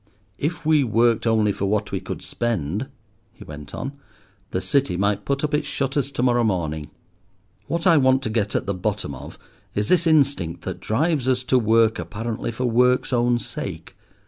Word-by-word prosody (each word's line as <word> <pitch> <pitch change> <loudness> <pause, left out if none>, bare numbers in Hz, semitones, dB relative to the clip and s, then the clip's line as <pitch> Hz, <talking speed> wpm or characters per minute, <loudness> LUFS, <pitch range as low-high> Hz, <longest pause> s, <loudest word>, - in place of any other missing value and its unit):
"If 160 +2 -2
we 155 -2 +4
worked 115 0 +2
only 110 -2 +3
for 100 - -3
what 105 +1 0
we - - -1
could - - -6
spend," 110 - -2 0.5
he - - -13
went 75 -1 -9
on, 135 +3 -4 0.6
"the 95 - -1
City 95 +1 +1
might 100 +1 0
put 140 +1 -1
up 150 0 -1
its 150 +1 +1
shutters 140 0 -1
to 125 - -1
morrow 120 -1 +3
morning. 80 -8 -1 0.8
What 170 +2 -2
I 170 -3 +6
want 130 -1 +4
to 110 - -2
get 110 -2 -1
at - - 0
the 100 - -1
bottom 100 -4 -2
of 65 - -10 0.4
is 105 +1 0
this 175 -2 +4
instinct 140 - +2
that - - -5
drives 145 +3 0
us 130 -1 +2
to 130 0 +3
work 110 -1 +3
apparently 110 +8 -4
for 125 +3 -3
work's 125 +2 +2
own 120 0 +3
sake. 120 - -6
120 Hz, 185 wpm, -23 LUFS, 105-135 Hz, 0.8 s, I